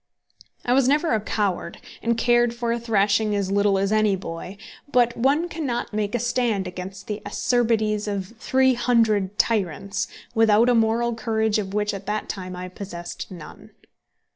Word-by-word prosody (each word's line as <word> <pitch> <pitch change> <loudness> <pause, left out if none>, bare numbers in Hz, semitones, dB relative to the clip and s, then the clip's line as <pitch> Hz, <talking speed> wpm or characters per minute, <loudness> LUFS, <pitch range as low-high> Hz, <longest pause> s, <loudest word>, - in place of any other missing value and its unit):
I 245 - +2
was 265 -1 +4
never 300 +4 +2
a 220 - +1
coward, 205 -3 -2 0.2
and 230 0 0
cared 240 0 +3
for 235 -1 -1
a 235 - 0
thrashing 210 -1 +2
as 195 -1 -1
little 200 0 +3
as 195 +1 0
any 215 -2 +3
boy, 180 +1 -7 0.3
but 240 -2 +3
one 280 +8 +2
cannot 285 -10 -3
make 210 +1 -1
a - - +1
stand 235 -4 0
against 185 +1 -7
the 210 0 -4
acerbities 215 -1 0
of 200 0 -4
three 260 +2 +3
hundred 220 -5 +2
tyrants 200 -2 0 0.3
without 225 +1 +4
a - - +5
moral 230 +1 +2
courage 220 -1 0
of 195 -1 -4
which 210 0 0
at 195 0 -7
that 210 +1 -2
time 185 -2 -5
I 180 0 -6
possessed 180 -2 -7
none. 175 -5 -11
215 Hz, 165 wpm, -23 LUFS, 200-235 Hz, 0.3 s, a